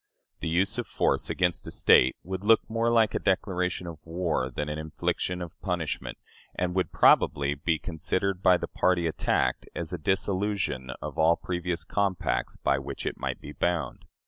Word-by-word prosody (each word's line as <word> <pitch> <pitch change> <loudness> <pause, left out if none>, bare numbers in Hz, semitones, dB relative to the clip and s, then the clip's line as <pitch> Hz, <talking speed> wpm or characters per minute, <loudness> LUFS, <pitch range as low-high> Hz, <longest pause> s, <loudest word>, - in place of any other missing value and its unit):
The - - -3
use 100 +8 +1
of 120 - -3
force - - 0
against 90 -2 0
a - - -3
State 65 - +5
would 95 +2 -5
look 110 +1 +4
more 115 +1 0
like 115 -2 +3
a - - 0
declaration 90 -2 0
of 85 -3 -7
war 80 -6 -1
than 75 +3 -4
an 75 +1 -3
infliction 90 +3 -2
of 85 - -11
punishment, 90 -5 -3 0.4
and 90 0 -1
would 95 0 0
probably 70 -1 +4
be 80 +3 0
considered 90 +4 -2
by 90 -2 +5
the - - -4
party 90 -2 +1
attacked 80 - 0
as 85 0 -4
a 90 - -3
dissolution 95 -6 -1
of - - -5
all 80 +1 +5
previous 90 -1 -3
compacts 100 -4 -1
by 70 0 +1
which 70 - -6
it - - -3
might - - -3
be - - -9
bound. 85 -7 -2
90 Hz, 175 wpm, -27 LUFS, 80-95 Hz, 0.4 s, State